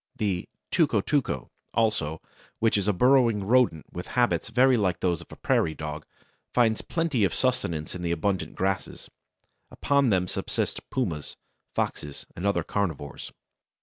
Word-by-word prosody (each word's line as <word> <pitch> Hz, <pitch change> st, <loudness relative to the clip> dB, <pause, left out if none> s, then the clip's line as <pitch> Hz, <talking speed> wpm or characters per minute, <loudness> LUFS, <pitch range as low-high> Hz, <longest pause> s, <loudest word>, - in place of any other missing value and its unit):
The 95 Hz, -4 st, -1 dB, 0.2 s
"tuco 150 Hz, -, +3 dB
tuco" 125 Hz, -, 0 dB, 0.3 s
also, 105 Hz, -9 st, 0 dB, 0.3 s
which 115 Hz, 0 st, +2 dB
is 100 Hz, -1 st, +1 dB
a -, -, +5 dB
burrowing 120 Hz, 0 st, +4 dB
rodent 115 Hz, -8 st, +3 dB
with 90 Hz, -, -6 dB
habits 120 Hz, -1 st, +2 dB
very 130 Hz, +2 st, +5 dB
like 95 Hz, -6 st, +1 dB
those 90 Hz, -3 st, 0 dB
of -, -, -13 dB
the -, -, -11 dB
prairie 80 Hz, -, +1 dB
dog, 75 Hz, 0 st, -6 dB, 0.5 s
finds 115 Hz, -3 st, +3 dB
plenty 165 Hz, -9 st, 0 dB
of 95 Hz, -, +2 dB
sustenance 85 Hz, -, -1 dB
in 90 Hz, -, -6 dB
the 85 Hz, -1 st, -1 dB
abundant 95 Hz, +3 st, -1 dB
grasses. 95 Hz, 0 st, -2 dB, 0.6 s
Upon 140 Hz, -2 st, +2 dB
them 90 Hz, -3 st, +2 dB
subsist -, -, -3 dB
pumas, 85 Hz, -, -2 dB, 0.4 s
foxes, 75 Hz, -2 st, -3 dB
and 90 Hz, +4 st, -2 dB
other 100 Hz, -, +1 dB
carnivores. 80 Hz, -8 st, -3 dB
100 Hz, 150 wpm, -27 LUFS, 85-125 Hz, 0.6 s, a